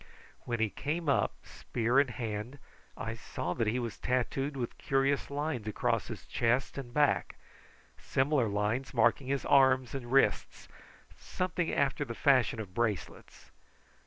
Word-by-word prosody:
When 120 Hz, -1 st, -2 dB
he 110 Hz, -2 st, +1 dB
came 160 Hz, +3 st, -3 dB
up, 140 Hz, -, +2 dB
spear 120 Hz, +2 st, 0 dB
in 140 Hz, -, +4 dB
hand, 115 Hz, +1 st, -5 dB, 0.4 s
I 115 Hz, -, -4 dB
saw 90 Hz, -5 st, -4 dB
that 115 Hz, +1 st, -1 dB
he 110 Hz, +4 st, +1 dB
was 120 Hz, -2 st, -4 dB
tattooed 135 Hz, +3 st, -1 dB
with 120 Hz, -2 st, -4 dB
curious 135 Hz, 0 st, +1 dB
lines 145 Hz, -6 st, -3 dB
across 105 Hz, -, 0 dB
his -, -, -8 dB
chest 125 Hz, +3 st, 0 dB
and 125 Hz, -3 st, -7 dB
back, 145 Hz, +2 st, +2 dB, 0.6 s
similar 135 Hz, -2 st, +1 dB
lines 105 Hz, +6 st, -1 dB
marking 120 Hz, +3 st, +3 dB
his 140 Hz, -1 st, -1 dB
arms 130 Hz, -2 st, +4 dB
and 125 Hz, -3 st, -6 dB
wrists, 135 Hz, +1 st, +2 dB, 0.5 s
something 180 Hz, -2 st, -2 dB
after 140 Hz, -2 st, +1 dB
the 115 Hz, -, -6 dB
fashion 130 Hz, -5 st, +3 dB
of 100 Hz, -4 st, -7 dB
bracelets. 105 Hz, -6 st, -3 dB
125 Hz, 145 wpm, -31 LUFS, 115-140 Hz, 0.6 s, in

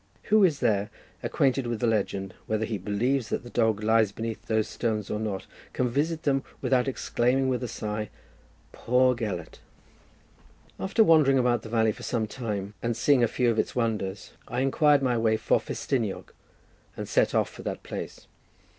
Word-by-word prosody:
Who 215 Hz, -1 st, +7 dB
is 160 Hz, -6 st, +3 dB
there 105 Hz, -4 st, +1 dB, 0.3 s
acquainted 135 Hz, -2 st, +1 dB
with 120 Hz, -2 st, -2 dB
the 120 Hz, -, 0 dB
legend, 100 Hz, -4 st, -1 dB
whether 110 Hz, 0 st, 0 dB
he 110 Hz, -2 st, -3 dB
believes 115 Hz, +6 st, 0 dB
that -, -, -2 dB
the 120 Hz, -, -11 dB
dog 110 Hz, -3 st, +1 dB
lies 110 Hz, -1 st, +3 dB
beneath 115 Hz, +1 st, -6 dB
those 110 Hz, -1 st, +1 dB
stones 105 Hz, -1 st, -2 dB
or 105 Hz, -, -1 dB
not, 105 Hz, -3 st, -3 dB, 0.3 s
can 125 Hz, -, 0 dB
visit 155 Hz, +6 st, -1 dB
them 135 Hz, -2 st, +2 dB, 0.2 s
without 130 Hz, 0 st, +1 dB
exclaiming, 130 Hz, 0 st, +1 dB
with 125 Hz, -1 st, 0 dB
a 125 Hz, -, -2 dB
sigh, 105 Hz, -2 st, -4 dB, 0.6 s
"Poor 125 Hz, +1 st, +2 dB
Gelert!" 100 Hz, -9 st, -5 dB, 1.2 s
After 195 Hz, +4 st, +3 dB
wandering 155 Hz, -7 st, +5 dB
about 120 Hz, -2 st, +2 dB
the 110 Hz, -, -9 dB
valley 110 Hz, -1 st, +2 dB
for -, -, -11 dB
some 115 Hz, -3 st, -1 dB
time, 105 Hz, -3 st, -4 dB
and 120 Hz, -1 st, -1 dB
seeing 140 Hz, -4 st, +4 dB
a -, -, +4 dB
few 120 Hz, +1 st, +1 dB
of 110 Hz, -, -1 dB
its -, -, -1 dB
wonders, 105 Hz, -5 st, -2 dB, 0.2 s
I 125 Hz, -, -2 dB
inquired 145 Hz, +1 st, +3 dB
my 125 Hz, -3 st, +1 dB
way 110 Hz, -1 st, +2 dB
for -, -, +2 dB
Festiniog, 115 Hz, -8 st, -3 dB, 0.6 s
and -, -, -5 dB
set -, -, +2 dB
off -, -, +1 dB
for -, -, -11 dB
that -, -, -5 dB
place. -, -, -7 dB
115 Hz, 180 wpm, -27 LUFS, 110-130 Hz, 1.2 s, Who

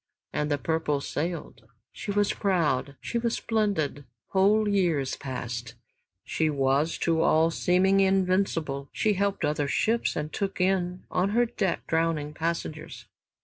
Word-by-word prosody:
And 150 Hz, -, -1 dB
"The 145 Hz, -, +1 dB
Purple" 160 Hz, -1 st, 0 dB
sailed; 165 Hz, +5 st, -4 dB, 0.2 s
she -, -, -8 dB
was 205 Hz, 0 st, +2 dB
proud, 155 Hz, -8 st, 0 dB
she 235 Hz, -, -2 dB
was 235 Hz, 0 st, 0 dB
splendid. 200 Hz, -11 st, -1 dB, 0.3 s
Whole 205 Hz, +3 st, +3 dB
years 175 Hz, -9 st, +1 dB
passed 125 Hz, -2 st, -5 dB, 0.5 s
she 160 Hz, -1 st, 0 dB
was 140 Hz, +2 st, +1 dB
to 165 Hz, -1 st, +2 dB
all 165 Hz, +1 st, +4 dB
seeming 185 Hz, +3 st, +3 dB
invincible, 185 Hz, -7 st, +1 dB
she 215 Hz, -, +1 dB
helped 200 Hz, -3 st, 0 dB
other 150 Hz, -1 st, 0 dB
ships 225 Hz, +10 st, +1 dB
and 150 Hz, +1 st, -4 dB
took 195 Hz, -1 st, -3 dB
in 180 Hz, -1 st, 0 dB
on 185 Hz, +2 st, +1 dB
her 240 Hz, -, +5 dB
deck 195 Hz, -5 st, -2 dB
drowning 160 Hz, -2 st, 0 dB
passengers. 160 Hz, -1 st, -4 dB
165 Hz, 140 wpm, -27 LUFS, 150-195 Hz, 0.5 s, her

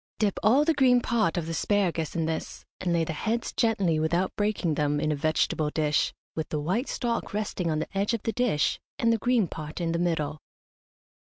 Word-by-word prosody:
Dip 210 Hz, -3 st, 0 dB
all 260 Hz, +8 st, +4 dB
the 325 Hz, -, +3 dB
green 255 Hz, -4 st, +5 dB
part 225 Hz, -8 st, +1 dB
of 170 Hz, -, -1 dB
the 165 Hz, -, -4 dB
asparagus 170 Hz, -2 st, 0 dB
in 165 Hz, -1 st, 0 dB
this, 160 Hz, 0 st, -4 dB
and 180 Hz, -, -1 dB
lay 170 Hz, -1 st, +2 dB
the 160 Hz, -, -3 dB
heads 225 Hz, +8 st, -2 dB
gently, 195 Hz, -8 st, +2 dB
without 170 Hz, +4 st, 0 dB
breaking 205 Hz, -6 st, 0 dB
them, 145 Hz, 0 st, 0 dB
in 155 Hz, -, 0 dB
a -, -, +1 dB
vegetable 155 Hz, 0 st, +1 dB
dish, 150 Hz, 0 st, +1 dB, 0.2 s
with 160 Hz, -1 st, -4 dB
the 150 Hz, -, -1 dB
white 185 Hz, -, -1 dB
stalk 235 Hz, -4 st, -2 dB
resting 200 Hz, -5 st, -2 dB
on 155 Hz, -, 0 dB
the 155 Hz, +5 st, -4 dB
edge 205 Hz, +4 st, +1 dB
of 225 Hz, -, -6 dB
the 225 Hz, -, 0 dB
dish, 235 Hz, -13 st, +1 dB, 0.2 s
and 230 Hz, 0 st, +3 dB
the 225 Hz, -, 0 dB
green 240 Hz, -4 st, +2 dB
part 155 Hz, 0 st, -7 dB
in 170 Hz, -1 st, -1 dB
the 170 Hz, -, -1 dB
middle. 155 Hz, -3 st, -1 dB
175 Hz, 215 wpm, -27 LUFS, 155-225 Hz, 0.2 s, green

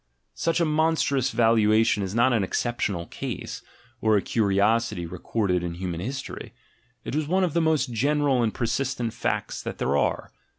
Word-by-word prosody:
Such 165 Hz, +1 st, 0 dB
a 170 Hz, -, +3 dB
monstrous 155 Hz, -4 st, +1 dB
valuation 110 Hz, -2 st, +3 dB
is 95 Hz, +1 st, -3 dB
not 120 Hz, +2 st, +4 dB
an 110 Hz, -4 st, +2 dB
exceptional 100 Hz, -4 st, -2 dB
case, -, -, -6 dB, 0.4 s
or 110 Hz, -1 st, +4 dB
a -, -, +1 dB
curiosity 105 Hz, -2 st, +1 dB
recorded 90 Hz, +2 st, -1 dB
in 85 Hz, -1 st, -4 dB
human 90 Hz, -2 st, -4 dB
history: 130 Hz, +7 st, -6 dB, 0.5 s
it -, -, -4 dB
is 150 Hz, 0 st, -1 dB
one 185 Hz, +4 st, +2 dB
of 175 Hz, -5 st, 0 dB
the 170 Hz, -, +2 dB
most 155 Hz, -6 st, +1 dB
general 140 Hz, +2 st, +2 dB
and 115 Hz, -2 st, +1 dB
persistent 120 Hz, 0 st, -2 dB
facts -, -, -2 dB
that -, -, -6 dB
there 70 Hz, -, 0 dB
are. 70 Hz, -, 0 dB
115 Hz, 165 wpm, -25 LUFS, 100-140 Hz, 0.5 s, not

